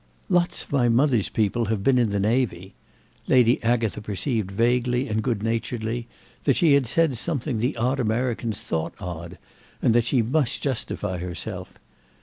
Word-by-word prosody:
"Lots 175 -1 +1
of - - -18
my 125 -4 +3
mother's 120 -3 +3
people 110 +2 0
have 105 -2 -2
been 130 +1 +4
in 120 -3 +2
the 100 0 -1
navy." 105 -3 0 0.5
Lady 125 -1 +4
Agatha 115 -2 0
perceived 105 +1 -2
vaguely 120 +4 +1
and 110 0 0
good 110 -4 -1
naturedly 115 +1 -2 0.4
that 140 - +4
she 160 -4 +4
had 140 -3 +3
said 160 +2 +2
something 135 -2 -2
the 120 +3 -1
odd 125 +4 0
Americans 115 -2 -1
thought 80 -8 -3
odd 90 -2 -7 0.4
and 115 - +3
that 120 0 +3
she 120 -1 +2
must 130 +2 0
justify 110 -8 -2
herself. 90 +2 -6
115 Hz, 160 wpm, -24 LUFS, 105-125 Hz, 0.5 s, been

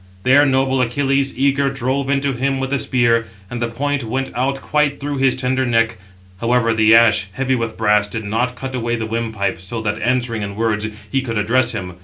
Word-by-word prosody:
There 140 +3 +5
noble 130 0 +1
Achilles, 135 +2 0
eager, 140 +1 +2
drove 135 +1 -2
into 140 0 +1
him 135 +2 -1
with 135 0 -3
the 140 - +1
spear, 115 -3 +1 0.2
and 120 0 -4
the 120 - +1
point 140 +4 -2
went 130 +4 -3
out 135 +2 -1
quite 150 -1 0
through 145 0 -3
his 135 -1 +2
tender 130 0 0
neck. 115 -3 +1 0.4
However 115 -1 +2
the 110 0 +5
ash, 105 -4 +4
heavy 130 +3 -1
with 115 -3 -2
brass, 105 -2 +2
did 110 +1 -5
not 125 +4 -1
cut 130 +1 -6
away 120 -1 -1
the 115 -1 -3
windpipe, 110 -5 -2
so 115 +5 -5
that, 105 0 -2
answering 120 -1 0
in 100 -1 -5
words, 110 -1 -1 0.2
he 135 - +1
could 115 -4 -4
address 120 +4 +2
him. 90 -5 -6
125 Hz, 205 wpm, -19 LUFS, 115-135 Hz, 0.4 s, There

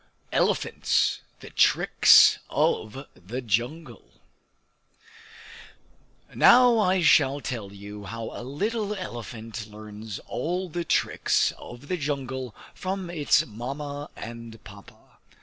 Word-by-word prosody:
Elephants: - - +1 0.2
The - - -11
Tricks - - +6
of 130 +6 -1
the 110 +8 -7
Jungle 120 +4 -3 2.2
Now 245 -1 +6
I 185 -3 +2
shall 140 -2 +4
tell 115 -8 -5
you 100 +1 -10
how 115 +3 -6
a - - -8
little 210 - -3
elephant 115 - -7
learns 105 0 -9
all 175 +9 -3
the 175 +2 -3
tricks - - +1
of 120 +4 -12
the 180 - -1
jungle 135 -5 -4 0.2
from 185 -1 -4
its 150 -5 +2
Mamma 140 +6 -6
and 115 -1 -9
Papa. 100 -1 -16
130 Hz, 105 wpm, -26 LUFS, 110-165 Hz, 2.2 s, Tricks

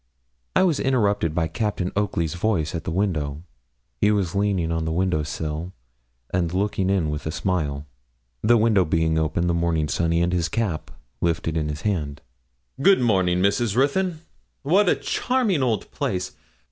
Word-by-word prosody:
I - - +5
was 170 -6 +2
interrupted 105 - +1
by 80 -2 +1
Captain 95 +2 -2
Oakley's 90 -6 0
voice 90 -4 0
at 85 -2 -4
the - - -2
window. 80 -6 -1 0.5
He 105 - +3
was 100 -4 +1
leaning 100 -5 0
on 80 -1 -1
the 80 - -2
window 90 -1 +1
sill, 80 +3 -4 0.6
and 85 -3 +1
looking 95 0 0
in 90 -6 +1
with 75 +1 -4
a - - -1
smile 75 -6 -2 0.6
the 120 +2 +5
window 110 -3 +4
being 80 0 +1
open, 80 +2 0
the 85 - +1
morning 85 -2 +1
sunny, 85 +2 +1
and 90 +1 0
his 85 -3 0
cap 100 -6 -2 0.3
lifted 80 -1 0
in 75 -2 -1
his 75 0 -5
hand. 80 -9 -2 0.6
'Good 195 +5 +6
morning, 95 -7 +2
Miss 100 0 +3 0.2
Ruthyn. 160 +6 +1 0.4
What 180 +7 +4
a - - +4
charming 245 - 0
old 115 -6 -1
place! 95 -11 -2
90 Hz, 165 wpm, -23 LUFS, 80-105 Hz, 0.6 s, Good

